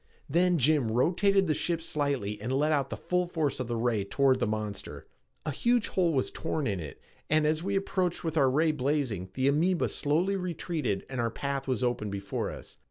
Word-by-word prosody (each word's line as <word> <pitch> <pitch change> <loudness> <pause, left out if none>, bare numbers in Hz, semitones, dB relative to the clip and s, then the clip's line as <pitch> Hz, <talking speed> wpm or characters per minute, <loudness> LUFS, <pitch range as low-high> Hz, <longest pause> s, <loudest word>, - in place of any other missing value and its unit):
Then 175 +3 +3
Jim 145 -3 +3
rotated 190 - +3
the 155 - +2
ship 170 +2 -1
slightly 140 -10 -2
and 120 +4 -3
let 145 +4 +2
out 140 -3 +1
the - - -4
full 180 0 0
force 160 -6 -1
of 130 - -2
the 120 - -2
ray 115 -3 +1
toward 130 +5 +2
the 120 - +1
monster. 105 -1 -4 0.4
A 155 - -1
huge 240 - +1
hole 180 -3 +2
was 135 -4 0
torn 160 -2 -2
in 100 -6 -1
it, 75 -4 -8 0.3
and 155 0 +3
as 155 +1 +1
we 195 +3 -1
approached 185 -2 0
with 165 -1 -2
our 140 -4 +4
ray 155 +4 +3
blazing, 130 - -1
the 130 +1 +1
amoeba 165 +5 +2
slowly 165 +7 +1
retreated 170 - -2
and 130 -2 -3
our 115 - +1
path 140 +3 -3
was 130 -1 0
open 120 -4 0
before 100 0 -3
us. - - -10
145 Hz, 205 wpm, -29 LUFS, 120-170 Hz, 0.4 s, our